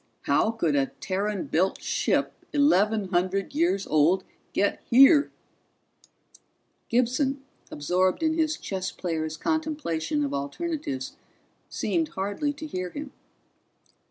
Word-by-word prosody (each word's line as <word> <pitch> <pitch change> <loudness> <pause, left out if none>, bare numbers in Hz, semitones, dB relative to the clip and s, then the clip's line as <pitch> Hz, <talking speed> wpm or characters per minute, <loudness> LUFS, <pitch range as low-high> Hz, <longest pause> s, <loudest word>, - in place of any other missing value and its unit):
How - - +2
could 175 -10 0
a 135 -1 +2
Terran 200 +3 -2
built 185 +4 +1
ship - - 0 0.2
eleven 220 -8 +3
hundred 185 +4 0
years 295 - +1
old 165 +5 +3 0.3
get 200 - 0
here?" 275 +4 +7 1.6
Gibson, 255 +3 +1 0.3
absorbed 180 - 0
in 315 0 +2
his 315 -1 0
chess 190 0 -4
player's 160 -3 -3
contemplation 290 - -1
of 140 - -4
alternatives, 140 - -4 0.5
seemed 330 -2 -1
hardly 205 +7 -2
to 300 +2 -8
hear 185 -11 -4
him. 285 +6 -7
200 Hz, 110 wpm, -26 LUFS, 175-290 Hz, 1.6 s, here